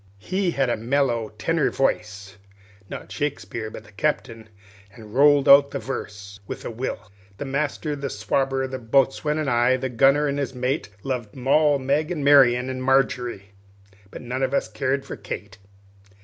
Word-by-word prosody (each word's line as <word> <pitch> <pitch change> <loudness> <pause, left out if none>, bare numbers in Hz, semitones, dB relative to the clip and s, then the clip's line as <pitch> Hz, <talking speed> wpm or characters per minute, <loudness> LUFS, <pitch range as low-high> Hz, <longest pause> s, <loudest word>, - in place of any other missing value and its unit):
He 185 - -1
had 135 -5 0
a 120 - 0
mellow 120 -1 0
tenor 165 -3 +1
voice 100 -7 -2 0.5
(not - - -8
Shakespeare, 140 -6 -4
but 110 - -10
the 105 - -18
Captain), 115 -2 -2 0.4
and 105 0 -13
rolled 145 +1 +5
out 140 0 +8
the - - -4
verse 105 -6 -7
with - - -7
a - - -4
will: 110 -4 -5 0.3
"The 145 - -5
master, 145 +2 -2
the 140 -1 -4
swabber, 135 0 -1
the 130 0 -5
boatswain, 135 +5 +1
and 155 -2 -2
I, 120 +1 +3
The 130 0 -3
gunner, 135 +4 +3
and 140 0 -1
his 135 -2 -3
mate, 125 0 -2
Lov'd 125 -6 -4
Mall, 140 +3 +3
Meg, 140 +4 0
and 150 -5 -3
Marian, 130 -3 +5
and 130 0 -4
Margery, 125 -6 0 0.6
But - - -10
none 125 +2 -4
of 135 +1 0
us - - 0
car'd 130 +6 -2
for - - -6
Kate." 100 0 -8
130 Hz, 170 wpm, -23 LUFS, 115-140 Hz, 0.6 s, out